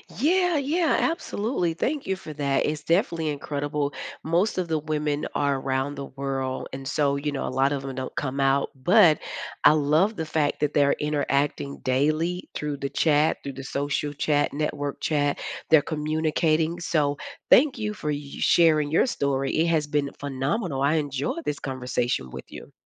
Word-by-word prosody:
Yeah, 355 - +2
yeah, 310 +4 +1
absolutely, 215 - -1
thank 280 - -2
you 190 - 0
for 175 -4 -9
that. 140 -2 0
It's 150 -1 -2
definitely 170 -1 +1
incredible, 145 0 -2 0.3
most 175 +7 +1
of 180 -2 -1
the 160 -1 +1
women 150 -1 -2
are 140 -1 +1
around 135 +2 -1
the 140 - -5
world, 135 -1 -4
and 135 0 -7
so, 140 -1 +1
you 145 +1 -2
know, 135 - -2
a - - -2
lot 135 +2 +2
of 140 - -2
them 135 -1 -6
don't 130 0 -5
come 140 -1 -3
out, 135 0 +2
but 165 +4 +5 0.5
I 150 - +9
love 155 +8 +2
the 160 - -3
fact 155 -1 0
that 150 -1 +1
they're 140 -1 +4
interacting 145 -1 -1
daily 155 +7 0
through 150 -1 -3
the 140 0 -3
chat, 150 0 +2
through 140 - -5
the 135 +1 -8
social 145 +1 -2
chat, 145 0 +1
network 145 -1 -3
chat, 145 -2 0 0.3
they're 160 -2 +7
communicating, 155 +2 0
so, 150 -4 0 0.3
thank 275 0 +6
you 210 -2 -2
for 150 -7 -5
y 145 -1 -3
sharing 155 -3 +4
your 165 - +3
story, 135 - -1
it 165 +2 +3
has 155 -3 +1
been 145 -2 0
phenomenal, 140 - -2
I 145 - +3
enjoyed 145 +2 -2
this 150 -1 -3
conversation 125 - -2
with - - -8
you. - - -11
150 Hz, 175 wpm, -25 LUFS, 140-165 Hz, 0.5 s, I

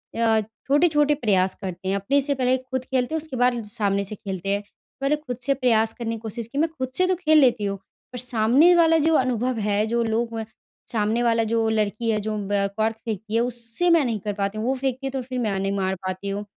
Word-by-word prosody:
अ, 225 -1 +3 0.3
छोटे-छोटे 295 0 +3
प्रयास 190 -8 +1
करते 185 0 -6
हैं 195 - +1
अपने 235 +9 +1
से 280 0 0
पहले 255 0 +2
ख़ुद 260 0 -5
खेलते 260 +3 -1
हैं - - +1
उसके 300 -4 -8
बाद 245 -1 +2
सामने 205 -2 0
से 205 +2 -5
खेलते 195 -1 -5
हैं। 200 +1 +1 0.4
पहले 275 +2 +2
ख़ुद 275 -6 -6
से 275 +1 +2
प्रयास 225 -4 +2
करने 230 -1 -4
कि - - -8
कोशिश 225 0 -4
कि 275 - -8
मैं 320 +3 +2
खुद 260 -1 -3
से 365 - +4
तो 370 - +2
खेल 315 -3 +3
लेती 245 -6 +3
हूँ 200 0 -2 0.4
पर 250 - -5
सामने 250 +8 +4
वाला 325 -1 +5
जो 325 - +3
अनुभव 255 -2 +1
है 205 +1 +1
जो 235 +1 +1
लोग 230 +1 -1
म 220 - -4 0.5
सामने 220 +1 0
वाला 230 -1 +2
जो 225 -1 +2
लड़की 215 +1 -1
है 215 -1 +1
जो 215 +1 -3
म 200 0 0
कॉर्क 220 +1 +1
फेंकती 215 0 -4
है 230 - +3
उससे 240 +7 -1
मैं 335 -3 +5
नहीं 225 -3 -1
कर 205 +1 -3
पाती 200 +1 -2
हूँ 215 - -2
वो 265 - +2
फेंकती 265 0 -3
है 270 - -4
तो 270 - -3
फिर 255 0 -5
मैं 210 -5 -1
नहीं 195 0 -1
मार 190 0 0
पाती 185 +2 -4
हूँ। 200 +1 -3
230 Hz, 245 wpm, -24 LUFS, 210-260 Hz, 0.5 s, वाला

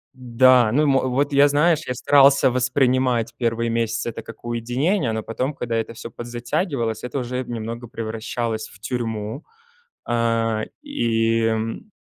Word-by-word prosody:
Да, 125 -2 +4
ну, 150 +5 +3
и - - +3
мо 135 -2 +3
Вот 140 +3 0
я, 140 +1 +6
знаешь, 150 +2 +3
я 125 - -2
старался 140 0 +5
воспринимать 125 -1 +1
первые 115 -1 0
месяцы 115 0 -1
это 115 - -7
как 115 +1 -13
уединение, 125 - 0
но 110 0 -3
потом, 130 +5 -3
когда 120 -4 -3
это 115 0 -2
всё 115 - -8
подзатягивалось, 120 - -3
это 125 +3 -3
уже 125 +1 -3
немного 115 0 -6
превращалось 115 -1 -4
в 105 - -17
тюрьму, 110 +2 -4 0.7
э, 115 -2 +1 0.2
и 115 - 0
м 115 - -2
120 Hz, 150 wpm, -22 LUFS, 115-130 Hz, 0.7 s, я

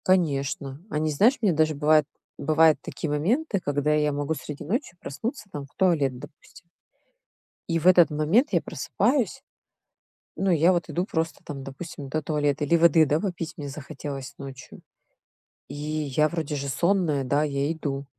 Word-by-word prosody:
Конечно. 140 -5 0
Они, 155 -1 -1
знаешь, 220 - +4
мне 200 -6 +3
даже 155 0 +2
бывает, 150 +1 +4 0.3
бывают 155 -2 +4
такие 155 - -5
моменты, 200 - 0
когда 145 +1 +1
я 150 -1 +2
могу 145 +2 -1
среди 150 0 -7
ночи 195 - -2
проснуться, 210 - -5
там, 145 -1 -6
в 135 - -25
туалет, 150 -9 +2
допустим 145 +4 -14 1.1
и 165 -1 +1
в 165 - 0
этот 175 -3 +7
момент 155 - +2
я - - +3
просыпаюсь. 265 -1 -1 1.0
Ну, 195 0 +1
я 170 +1 +4
вот 175 -1 -1
иду 175 - -1
просто 160 -5 -2
там, 140 -2 -7
допустим, 135 +1 -8
до 155 +3 -2
туалета. 145 -1 0
Или 170 +4 +3
воды, 165 -1 +5
да, 150 +3 +1
попить 175 -4 -4
мне 145 -4 -6
захотелось 140 -1 -7
ночью. 135 -2 -10 0.9
И 140 - -7
я 150 0 0
вроде 160 -3 -3
же 140 0 -3
сонная, 170 -1 +1
да, 145 +3 +1
я 140 0 -1
иду. 145 -4 -4
155 Hz, 160 wpm, -25 LUFS, 145-170 Hz, 1.1 s, этот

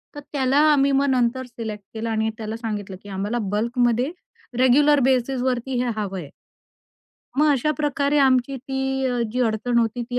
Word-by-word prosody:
तर - - -6
त्याला 270 -1 +1
आम्ही 280 -1 +3
मग 275 +1 +2
नंतर 255 0 +1
सिलेक्ट 220 -4 -7
केलं 225 +1 -4
आणि 220 0 0
त्याला 220 0 -5
सांगितलं 210 -4 -5
की 205 - -11
आम्हाला 200 +5 -2
बल्कमध्ये 235 - 0 0.5
रेग्युलर 285 +3 +5
बेसिसवरती 255 0 0
हे 245 - -1
हवंय. 190 -8 -4 1.1
मग 300 - +5
अशा 280 +2 +1
प्रकारे 290 -1 +1
आमची 265 0 +3
ती 265 0 -2
अ, 245 -1 -1
जी 250 - -1
अडचण 235 +1 +1
होती 235 +1 0
ती 245 - -1
245 Hz, 160 wpm, -23 LUFS, 225-265 Hz, 1.1 s, रेग्युलर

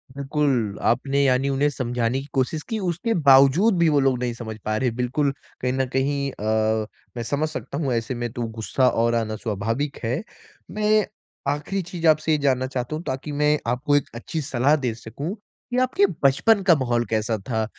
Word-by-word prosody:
बिल्कुल। 140 -7 0
आपने 135 +4 +2
यानी 135 0 +2
उन्हें 140 +2 +2
समझाने 125 -2 -1
की 135 - -8
कोशिश 140 +4 0
की 225 - -1
उसके 185 +4 -1
बावजूद 140 +10 +6
भी 170 -1 +4
वो 145 -2 +3
लोग 135 -2 +2
नहीं 125 -1 -1
समझ 110 -2 -7
पा 110 - 0
रहे 125 +2 +1
है। 115 - -7
बिल्कुल 130 +4 0 0.3
कहीं 125 0 0
न 130 0 +1
कहीं 140 +1 0
अ, 110 0 0 0.3
मैं 120 - -2
समझ 145 +6 -1
सकता 140 - -6
हूँ 140 -5 -1
ऐसे 115 +2 -2
में 120 -1 -3
तो 120 -2 -3
गुस्सा 125 +4 +1
और 115 0 +1
आना 110 -2 -1
स्वाभाविक 115 +6 -2
है। 125 +8 -1 0.5
मैं 215 0 +2 0.5
आख़िरी 150 +7 -2
चीज़ 170 -1 -3
आपसे 155 0 +3
ये 155 - +4
जानना 130 -2 +1
चाहता 130 +2 -3
हूँ 160 - -5
ताकि 135 0 -4
मैं 150 +1 +2
आपको 135 +5 +1
एक 145 - +1
अच्छी 155 +7 -4
सलाह 135 +1 +2
दे 130 -6 -1
सकूँ 140 - -6 0.4
कि 245 - 0
आपके 255 -5 +3 0.2
बचपन 195 +10 +4
का 180 -3 +6
माहौल 120 -4 0
कैसा 110 0 0
था? 110 +2 -2
135 Hz, 195 wpm, -23 LUFS, 120-150 Hz, 0.5 s, बावजूद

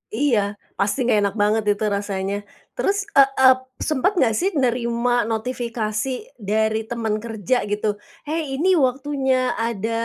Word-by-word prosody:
Iya, 245 -3 +2 0.4
pasti 200 +6 +1
enggak 235 -3 +3
enak 200 0 0
banget 215 +1 +2
itu 205 - -5
rasanya. 200 -1 -2 0.4
Terus, 400 +1 +1
eee 275 -7 +6 0.2
eee, 260 0 +8 0.3
sempet 305 +6 +2
enggak 255 -10 +3
sih 380 - +2
nerima 240 -2 +1
notifikasi 230 0 -2 0.3
dari 220 +1 +1
teman 220 -2 -2
kerja 225 0 -1
gitu, 205 0 -1 0.2
"Hei, 305 -2 -3
ini 345 +7 +2
waktunya 265 -1 +1
ada 230 -1 -2
235 Hz, 135 wpm, -22 LUFS, 215-260 Hz, 0.4 s, eee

